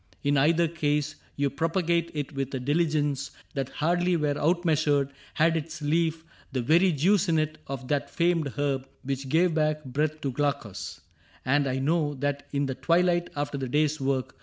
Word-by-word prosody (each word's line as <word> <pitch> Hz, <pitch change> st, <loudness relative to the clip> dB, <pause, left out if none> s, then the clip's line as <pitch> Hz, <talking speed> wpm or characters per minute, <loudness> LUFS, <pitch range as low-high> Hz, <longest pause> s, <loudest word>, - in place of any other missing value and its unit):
In 145 Hz, 0 st, +2 dB
either 165 Hz, +5 st, +4 dB
case. 150 Hz, -2 st, 0 dB, 0.2 s
You 140 Hz, -1 st, 0 dB
propagate 170 Hz, +2 st, 0 dB
it 145 Hz, 0 st, -3 dB
with 135 Hz, -1 st, -3 dB
a -, -, -2 dB
diligence 145 Hz, 0 st, 0 dB, 0.2 s
That 135 Hz, -3 st, -2 dB
hardly 175 Hz, +3 st, +1 dB
were 150 Hz, -2 st, +1 dB
outmeasured 155 Hz, -4 st, +2 dB, 0.2 s
had 165 Hz, +1 st, +3 dB
its 160 Hz, +1 st, -4 dB
leaf 160 Hz, +2 st, 0 dB, 0.3 s
The 130 Hz, -3 st, -1 dB
very 170 Hz, +8 st, +4 dB
juice 180 Hz, +6 st, +2 dB
in 165 Hz, -, +3 dB
it 155 Hz, 0 st, -1 dB
of 135 Hz, -2 st, -5 dB
that 145 Hz, -1 st, 0 dB
famed 170 Hz, -3 st, +1 dB
herb 135 Hz, -2 st, -1 dB, 0.2 s
Which 135 Hz, 0 st, -3 dB
gave 165 Hz, +4 st, +3 dB
back 155 Hz, -1 st, 0 dB
breath 150 Hz, +4 st, -1 dB
to 135 Hz, -, -1 dB
Glaucus; 140 Hz, -7 st, -3 dB, 0.4 s
and 140 Hz, +2 st, +2 dB
I 130 Hz, 0 st, -1 dB
know 145 Hz, +1 st, +1 dB
That 145 Hz, +1 st, -2 dB
in 140 Hz, 0 st, 0 dB
the 135 Hz, -, -2 dB
twilight, 175 Hz, +3 st, +2 dB
after 145 Hz, -1 st, -2 dB
the 130 Hz, -, -3 dB
day's 150 Hz, +2 st, +1 dB
work. 130 Hz, -1 st, -1 dB
150 Hz, 175 wpm, -27 LUFS, 140-165 Hz, 0.4 s, either